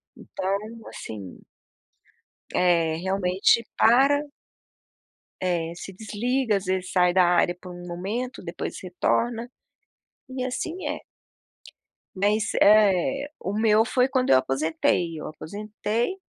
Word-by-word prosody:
então, 195 +1 -3 0.3
assim 100 -5 -8 1.1
eh, 170 -3 +2
realmente, 190 +4 +2
para 275 +6 +4 1.2
É, 170 -2 -1
se 185 - -8
desliga, 225 +4 -1
às 195 - -6
vezes, 185 0 -2
sai 180 -1 +3
da 185 0 +5
área 175 0 +3
por 180 - -9
um 175 0 -9
momento, 200 +9 -4
depois 170 0 -5
retorna, 230 +6 -1 0.8
e 260 -1 -4
assim 330 +8 -4
é. - - -3 1.2
Mas, 210 +2 +1
eh, 215 +7 +4
o 195 - -3
meu 215 0 +4
foi 250 +2 +2
quando 260 -1 0
eu 130 - +7
aposentei, 160 +4 0
eu - - -6
aposentei, 210 - -3
195 Hz, 115 wpm, -25 LUFS, 175-235 Hz, 1.2 s, eu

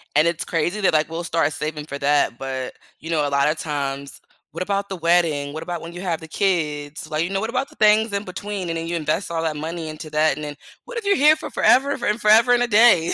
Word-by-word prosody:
And 155 +3 +5
it's 170 0 -1
crazy 175 +5 -1
that, 190 - +3
like, 155 0 +2
we'll 165 +1 -4
start 165 -2 0
saving 150 0 -4
for 140 - -6
that, 145 -4 +2
but 130 -1 -5 0.2
you 160 - -9
know, 155 -3 +1
a - - -2
lot 140 +1 +2
of 155 - -1
times 140 -2 -4 0.3
"What - - -7
about 200 +1 -1
the 190 - -4
wedding? 165 -4 +1
What 160 - -5
about 175 -1 -5
when 165 +1 -9
you 175 - -7
have 175 -4 -2
the 160 - -9
kids," 155 -5 -2
like, 155 0 0
you 175 - -3
know, 195 - 0
what 220 +3 -3
about 275 +3 -2
the - - -18
things 215 0 +4
in 200 0 -1
between 195 -1 -5
and 165 - -2
then 165 - -4
you 170 - -2
invest 165 +3 -2
all 165 - -1
that 160 -2 -1
money 160 +1 -5
into 155 0 -8
that, 155 +1 +2
and 150 - -7
then 145 -1 -5 0.3
"What - - -8
if 440 - -12
you're 400 0 +3
here 305 -1 +6
for - - -7
f - - -13
forever 275 +3 +4
and 210 +3 0
forever 225 +3 +6
and 245 - +3
a 245 - 0
day 210 -7 +5
165 Hz, 275 wpm, -22 LUFS, 150-200 Hz, 0.3 s, here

